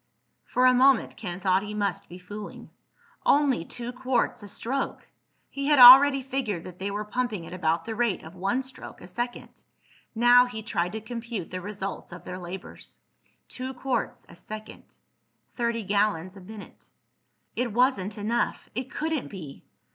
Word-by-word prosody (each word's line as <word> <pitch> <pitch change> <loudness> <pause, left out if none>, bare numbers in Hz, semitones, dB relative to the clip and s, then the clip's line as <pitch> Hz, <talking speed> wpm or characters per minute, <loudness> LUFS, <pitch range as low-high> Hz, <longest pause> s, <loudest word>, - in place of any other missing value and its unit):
For 250 - +2
a 255 - +7
moment 260 0 +4
Ken 180 -5 -6
thought 190 0 +2
he 210 +1 -6
must 200 -4 -2
be 175 - -9
fooling. 205 +3 -9 0.5
Only 280 - +3
two 240 +7 -6
quarts 250 -1 -1
a 205 - -9
stroke! 265 +7 -3 0.5
He 275 0 -3
had 295 -1 +4
already 270 +2 +10
figured 250 -10 -3
that 180 -1 -11
they 195 +2 -2
were 205 +1 -3
pumping 215 -5 -2
at - - -9
about 165 -2 0
the 225 - -4
rate 230 -4 0
of 160 - -11
one 200 +8 -1
stroke 260 0 -10
a 175 - -12
second. 240 +6 -6 0.5
Now 245 +2 +6
he 220 -3 -7
tried 180 -4 -2
to 220 - -4
compute 230 -4 -6
the 185 0 -4
results 200 -1 -6
of 175 - -10
their 180 - -7
labors. 180 +1 -9 0.5
Two 260 0 -6
quarts 245 -1 -3
a - - -14
second—thirty 220 +3 -7
gallons 200 -2 0
a 195 - -12
minute. 205 +2 -12 0.7
It 245 -1 -1
wasn't 220 -4 +1
enough! 225 +3 -1
It 255 +3 -3
couldn't 315 -2 -2
be! 160 -9 -10
220 Hz, 160 wpm, -26 LUFS, 190-250 Hz, 0.7 s, already